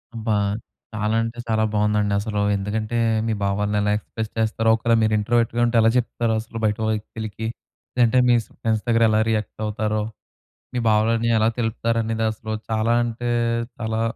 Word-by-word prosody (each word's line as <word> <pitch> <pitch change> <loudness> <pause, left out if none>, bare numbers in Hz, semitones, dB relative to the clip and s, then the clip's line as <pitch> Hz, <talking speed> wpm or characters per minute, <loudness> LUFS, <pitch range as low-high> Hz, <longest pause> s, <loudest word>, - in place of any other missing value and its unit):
అబ్బా! 110 -1 -1 0.6
చాలా 110 +1 0
అంటే 115 +1 -5
చాలా 110 -1 +1
బాగుందండి 105 -1 +1
అసలు. 105 0 -3 0.2
ఎందుకంటే, 105 +3 -2 0.3
మీ 110 - +1
భావాల్ని 105 +1 0
ఎలా 105 0 +1
ఎక్స్‌ప్రెస్ 110 0 -6
చేస్తారో, 110 0 +1
ఒకేళ 115 +1 +1
మీరు 110 0 +2
ఇంట్రోవర్ట్‌గా 115 +2 +1
ఉంటే 120 0 0
ఎలా 110 - +5
చెప్తారో 115 -1 0
అసలు 115 +1 -9
బయట 105 0 +1
వ్యక్తులకి, 110 0 -4 0.5
లేదంటే 125 0 +4
మీస్ 120 -2 +3
ఫ్రెండ్స్ 110 -2 0
దగ్గర 115 0 +3
ఎలా 110 - +3
రియాక్ట్ 110 -1 -2
అవుతారో 105 0 -1 0.7
మీ - - 0
భావాలన్ని 115 +2 +2
ఎలా 110 +1 +3
తెలుపుతారనేది 115 0 0
అసలు 110 0 -6 0.2
చాలా 110 +1 +1
అంటే 120 +1 -3 0.5
చాలా 110 -1 -2
110 Hz, 155 wpm, -23 LUFS, 105-115 Hz, 0.7 s, ఎలా